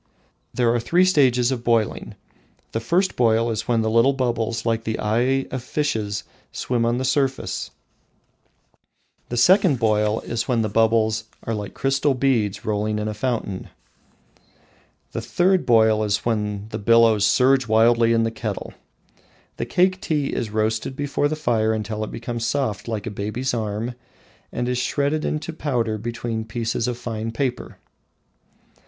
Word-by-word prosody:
There 120 -2 +2
are 120 - +1
three 175 +10 +3
stages 130 -8 +3
of 125 -3 -3
boiling: 115 -3 0 0.6
the 115 - -1
first 175 +12 +1
boil 115 -1 +2
is 110 -1 -3
when 115 -2 +2
the 110 - 0
little 115 +5 +4
bubbles 120 -3 -1
like 115 -1 0
the 110 -1 -2
eye 125 +5 +1
of 130 - -3
fishes 110 -7 -2 0.3
swim 120 -2 -1
on 120 +1 +1
the 130 - -2
surface; 135 0 -1 1.6
the 120 - -3
second 180 - +5
boil 105 -1 +1
is 115 - -3
when 120 -4 +1
the 110 - -1
bubbles 110 0 +2 0.2
are 115 - -3
like 105 -2 -5
crystal 135 +1 +1
beads 120 -7 0
rolling 105 0 -1
in 105 0 -2
a 105 - -2
fountain; 105 -4 -3 1.4
the - - -4
third 185 +1 +1
boil 110 -2 +4
is 105 -1 -1
when 105 -3 -1
the - - -5
billows 115 -1 +4
surge 125 +5 +3
wildly 115 +1 +4
in 115 0 +3
the 115 - 0
kettle. - - -5 0.8
The - - -3
Cake 185 +1 +2
tea 150 -4 -1
is 115 - -2
roasted 110 +4 -1
before 145 +1 0
the 155 - -2
fire 115 -7 +1
until 110 0 -3
it 110 - -4
becomes 120 0 -5
soft 115 -5 -1
like 110 -2 -3
a 115 - -4
baby's 105 +6 -3
arm 110 +1 -3 0.6
and 120 0 -2
is 125 0 0
shredded 145 +4 0
into 155 +2 -3
powder 120 -8 -1
between 115 0 -4
pieces 115 +1 -2
of 125 -1 -2
fine 115 -2 -4
paper. 125 +1 -3
115 Hz, 160 wpm, -22 LUFS, 110-130 Hz, 1.6 s, second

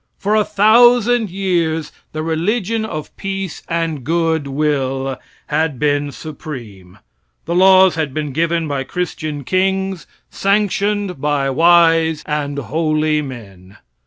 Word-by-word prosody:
For 205 +2 -1
a 215 0 +4
thousand 235 +2 +4
years 170 -4 -1 0.2
the 155 0 -4
religion 210 +7 -1
of 155 -7 -7
peace 195 -3 -4
and 165 -4 -2
good 160 0 0
will 135 -2 -1 0.3
had 155 -4 -1
been 145 +1 0
supreme. 120 - -9 0.5
The 170 - -2
laws 190 0 +6
had 155 -3 -2
been 150 +1 -3
given 165 +2 0
by 140 -2 -2
christian 155 -1 -4
kings, 190 +2 -1 0.2
sanctioned 200 -3 0
by 145 -2 0
"wise 165 0 +4
and 145 -1 -3
holy 155 +2 0
men." 100 -8 -10
160 Hz, 120 wpm, -18 LUFS, 145-190 Hz, 0.5 s, laws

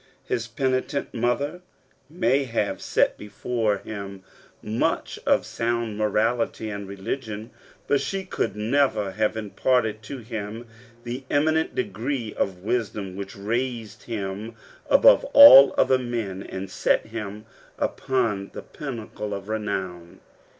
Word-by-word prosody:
His 115 -1 -2
penitent 130 +3 -1
mother 120 +8 -1 0.5
may 145 -5 +1
have 115 -4 -2
sat - - +1
before 110 0 -1
him 100 -2 -8 0.4
much 110 +2 -1
of - - +3
sound 115 -2 -2
morality 110 +1 0
and 100 -1 -6
religion, 105 +3 -5 0.3
but 145 - +2
she 195 -1 -3
could 185 - -2
never 110 -2 +1
have 110 +2 0
imparted 110 +1 0
to 120 +6 -7
him 110 -1 -6 0.4
the 125 +3 -5
eminent 155 +2 +1
degree 115 +1 -3
of 95 -2 -2
wisdom 105 -4 -2
which 100 +2 -7
raised 115 +2 -3
him 105 0 -5 0.3
above - - +7
all 140 - +11
other 130 - +4
men 115 -6 -3
and 95 -1 -7
set - - +1
him 105 -1 -7 0.3
upon 115 -7 -1
the - - -6
pinnacle 110 -6 -6
of 100 +1 -8
renown. 95 -5 -4
110 Hz, 120 wpm, -25 LUFS, 105-125 Hz, 0.5 s, all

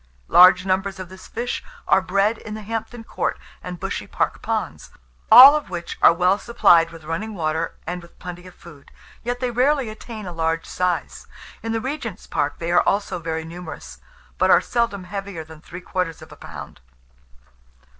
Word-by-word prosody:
Large 180 +1 +7
numbers 190 +1 -1
of 185 -2 -7
this 190 0 -12
fish 240 +2 -4 0.2
are - - +4
bred 200 +4 +1
in 215 - -7
the 215 - -8
Hampton 225 +2 -5
Court - - -2 0.3
and 180 -1 -7
Bushy - - -4
Park - - -2
ponds, - - -3 0.4
all 270 +4 +11
of 300 -10 -3
which 175 -2 -6
are - - +8
well 180 +4 +2
supplied 175 -8 +4
with 165 -1 -13
running 195 +8 -4
water 160 -1 -2
and 180 +2 -4
with 170 - -18
plenty 180 0 -9
of 180 - -14
food; 150 -5 -15 0.3
yet 245 +1 -3
they 250 -1 -1
rarely 260 +1 +1
attain 215 0 -9
a 180 - -6
large 165 0 -1
size. 180 -1 -2 0.3
In 225 - -4
the 225 - 0
Regent's 250 -5 -5
Park 145 0 -2
they 170 +1 -3
are 175 - +5
also 195 -3 -1
very 160 -1 -4
numerous; 160 - -9 0.4
but - - +3
are - - +7
seldom 235 -5 -1
heavier 195 -2 -6
than 155 0 -14
three 180 +3 -10
quarters 180 -3 -3
of - - -15
a - - -11
pound. - - -10
185 Hz, 185 wpm, -22 LUFS, 170-220 Hz, 0.4 s, all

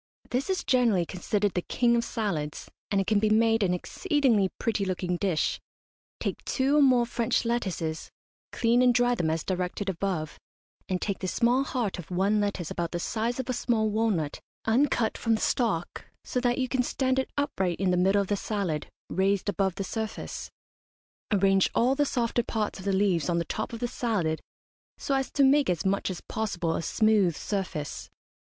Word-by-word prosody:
This 260 +8 -1
is 375 - 0
generally 235 -9 +3
considered 200 +3 -1
the 180 - 0
king 235 +5 +2
of 235 - +1
salads, 170 -11 -3 0.2
and 200 - +1
it 195 - +1
can 210 +1 +3
be 215 +1 +2
made 225 +1 +3
an 190 -3 +2
exceedingly 240 - +1
pretty 220 -3 0
looking 180 -1 -1
dish, 175 -3 0 0.6
Take - - -3
two 270 +3 +1
or - - +6
more 255 -3 +5
French 235 0 0
lettuces, 185 -9 -2 0.4
clean 235 +1 +2
and 250 -1 +4
dry 245 +1 +3
them 170 -9 0
as 160 0 -1
directed 185 +2 -2
above, 175 -4 -3 0.5
and 185 -1 0
take 200 0 -2
the 185 - -3
small 240 +7 +2
heart 240 -9 -2
of 175 - -9
one 195 +4 +2
lettuce 200 -5 -2
about 170 0 -3
the 175 - -1
size 230 +7 -2
of 260 - -3
a 255 - 0
small 220 -3 +1
walnut, 205 -9 0 0.3
uncut 235 -1 +2
from 230 -1 +2
the - - -3
stalk, 205 -9 0 0.2
so 250 - -2
that 245 -1 +1
you 260 -1 0
can 255 0 +1
stand 260 +1 0
it 265 - -2
upright 190 - -1
in 190 -1 +2
the - - +3
middle 195 +3 +3
of - - -8
the 205 - +1
salad, 195 -7 -2 0.2
raised 195 +2 +1
above 195 -3 0
the 195 - -3
surface. 220 +2 -5 0.8
Arrange 195 -1 +4
all 250 +3 +3
the 290 +1 +1
softer 240 -1 0
parts 215 -4 -3
of 190 - -9
the 200 - +1
leaves 190 -5 +1
on 170 - +1
the 170 - 0
top - - -3
of 230 - -6
the 240 - -1
salad 195 -11 -1 0.6
so 275 - -2
as 270 -1 0
to 280 - +2
make 275 -1 +4
as 180 +1 -1
much 195 +1 +1
as 185 - -5
possible 175 -7 -2
a - - -1
smooth 205 -2 +2
surface. 185 -7 -4
205 Hz, 195 wpm, -27 LUFS, 185-240 Hz, 0.8 s, or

